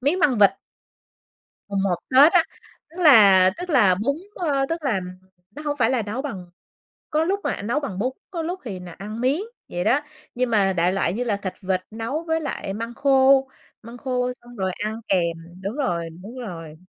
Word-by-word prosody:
miến 290 +8 +1
măng 265 - +3
vịt. 200 -2 +7 1.2
Mùng 200 -1 -1
một 190 -3 +1 0.2
Tết 280 +7 +7
á, 355 -3 +6 0.5
tức 350 - -9
là 200 - +8
tức 360 0 -5
là 210 - +5
bún, 235 +9 -1 0.2
ơ, 280 -6 0
tức 330 0 -3
là 235 -9 0 0.5
nó 295 +8 -10
hông 290 -1 -2
phải 245 -2 +2
là 255 -3 +1
nấu 215 +6 -4
bằng 190 -11 -7 0.6
có 310 +1 +2
lúc 395 +3 0
mẹ - - -2
nấu 240 +8 0
bằng 205 -10 -5
bún, 250 +6 0 0.2
có 340 -4 -3
lúc 355 +3 -4
thì 195 -7 -6
là 180 -1 -9
ăn 210 +5 -7
miến, 270 +8 +1 0.3
vậy 175 0 -3
đó. 275 +5 +3 0.3
Nhưng 250 0 0
mà 200 -4 +3
đại 175 +1 +2
loại 195 -3 0
như 245 +5 -2
là 215 -4 0
thịt 195 -2 -5
vịt 185 -1 0
nấu 230 +9 -3
với 320 0 0
lại 195 -9 -4
măng 230 +2 -5
khô, 270 0 +4 0.3
măng 235 +2 -10
khô 250 -1 -1
xong 240 -1 -16
rồi 190 -2 -1
ăn 220 +1 -4
kèm 170 -3 +1 0.3
đúng 200 +7 -4
rồi, 170 - -1
đúng 235 +6 -9
rồi. 165 -9 -7
235 Hz, 205 wpm, -23 LUFS, 195-280 Hz, 1.2 s, là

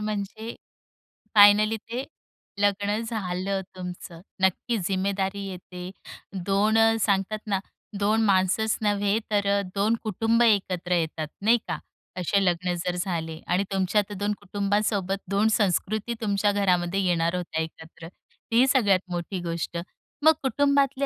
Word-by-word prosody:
म्हणजे, 215 +2 -4 0.8
फायनली 210 +1 +7
ते 235 +4 -5 0.6
लग्न 205 +1 +1
झालं 195 -3 -2
तुमचं. 180 -2 -8 0.2
नक्की 190 +5 +1
जिम्मेदारी 195 +1 -1
येते. 180 -1 -8 0.6
दोन 205 +3 +2
अ, 225 0 +5
सांगतात 200 +1 +1
ना, 195 -2 +1 0.4
2 215 +2 +2
माणसंच 200 +2 +2
नव्हे 205 0 +1
तर 205 -1 +1
अ, - - 0
2 210 +3 +2
कुटुंब 225 +2 +1
एकत्र 190 -5 +1
येतात, 160 -2 -2
नाही 225 +4 +5
का? - - -3 0.4
असे 195 +2 +1
लग्न 180 0 +1
जर 180 -1 -1
झाले 165 -3 -3
आणि 185 +2 +2
तुमच्या 195 +2 +2
तर - - -6
2 205 +1 0
कुटुंबासोबत 200 -1 0
2 200 +2 +2
संस्कृती 210 +3 0
तुमच्या 205 -1 +1
घरामध्ये 185 -2 +1
येणार 170 -1 +1
होत्या 170 -3 -2
एकत्र. 160 0 -9 0.4
ही 240 +3 +5
सगळ्यात 210 -9 +4
मोठी 175 +2 -3
गोष्ट. 170 0 -3 0.5
मग 315 - +8
कुटुंबातले 280 0 +2
200 Hz, 130 wpm, -26 LUFS, 180-215 Hz, 0.8 s, मग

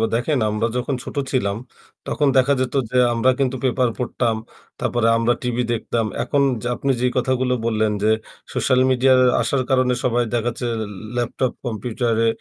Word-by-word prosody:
দেখেন। 130 +3 0
আমরা 105 +2 0
যখন 130 +2 -1
ছোট - - -8 0.2
ছিলাম 100 -6 0 0.5
তখন 145 - +1
দেখা 135 +2 +4
যেত 130 - -2 0.2
যে 125 - +1 0.2
আমরা 120 +3 +3
কিন্তু 130 -1 +1
পেপার 130 -1 +2
পড়তাম। 120 -2 -1 0.4
তারপরে 120 -1 0
আমরা 115 +1 +2
টিভি 125 0 0
দেখতাম। 115 0 -1 0.2
এখন 140 - +1 0.2
যে 120 - -3
আপনি 140 - 0
যেই 125 0 +1
কথাগুলো 130 0 +1
বললেন 110 -2 +1
যে 110 - +3 0.4
সোশ্যাল 130 - +2
মিডিয়ার 130 0 +4 0.2
আসার 140 - +1
কারণে 130 -1 +3
সবাই 120 -1 +2
দেখাচ্ছে 120 +1 -2
ল 115 -1 -2 0.3
ল্যাপটপ 120 +1 -1
কম্পিউটারে 115 0 -1
125 Hz, 160 wpm, -21 LUFS, 115-130 Hz, 0.5 s, দেখা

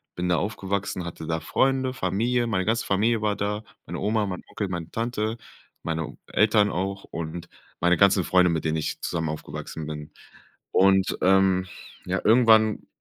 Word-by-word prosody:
Bin 90 0 -2
da 85 - +3
aufgewachsen, 100 -2 -3
hatte 85 -2 -7
da 80 0 -1
Freunde, 130 +4 +1
Familie, 120 +4 0
meine 95 -5 0
ganze 115 +1 0
Familie 110 +3 +2
war 105 -1 +1
da, 105 +1 -2 0.2
meine - - -5
Oma, 105 +1 +1
mein 90 -2 -5
Onkel, 100 - -3
meine 85 -2 -4
Tante, 115 -1 -2 0.5
meine 80 -2 -3
Eltern 105 -1 +3
auch 95 +2 -3
und 85 +1 -6 0.3
meine 90 0 +3
ganzen 100 -1 +4
Freunde, 90 +1 +4
mit 80 -2 -1
denen 80 0 +1
ich 80 - -3
zusammen 80 -2 -2
aufgewachsen 75 0 -6
bin. 75 -1 -7 0.6
Und, 95 0 +4
ähm, 95 0 +3 0.4
ja, - - -1
irgendwann 110 -1 +4
95 Hz, 160 wpm, -25 LUFS, 85-110 Hz, 0.6 s, ganzen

